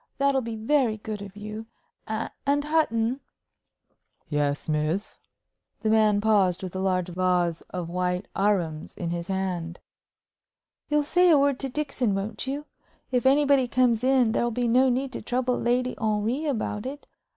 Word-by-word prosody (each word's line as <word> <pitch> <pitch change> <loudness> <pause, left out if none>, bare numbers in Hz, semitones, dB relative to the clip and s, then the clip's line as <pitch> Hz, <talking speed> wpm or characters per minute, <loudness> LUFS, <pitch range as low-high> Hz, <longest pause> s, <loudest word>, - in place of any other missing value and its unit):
That'll 275 -1 +2
be 230 -2 -5
very 225 0 +1
good 215 -1 -6
of 200 -1 -9
you. 215 +2 -7 0.4
And, 275 +6 -1
Hutton 260 -6 +1 0.6
" - - -48 0.3
"Yes, 145 -1 -1
miss." 155 +6 -1 0.6
The 220 - +1
man 215 -2 +4
paused 200 -5 +2
with 185 -1 -6
a - - -2
large 185 -2 0
vase 180 -2 +1
of 180 -2 -4
white 180 +2 -2
arums 180 -6 0
in 170 -2 -3
his 170 0 -3
hand. 180 -3 -3 1.1
"You'll 295 0 +2
say 355 +4 +4
a 315 - +7
word 280 -1 +2
to 270 - -3
Dixon, 260 -6 -1
won't 210 +6 -4
you? 285 +2 -3 0.5
If 250 0 +2
anybody 280 -1 +4
comes 245 -1 +2
in, 255 -3 +4
there'll 240 +1 +1
be 240 +1 -1
no 255 +3 +4
need 260 +2 -1
to - - -5
trouble 250 0 0
Lady 250 +1 +1
Henry 220 +6 0
about 225 -5 -2
it. 285 +2 -7
220 Hz, 160 wpm, -26 LUFS, 190-260 Hz, 1.1 s, a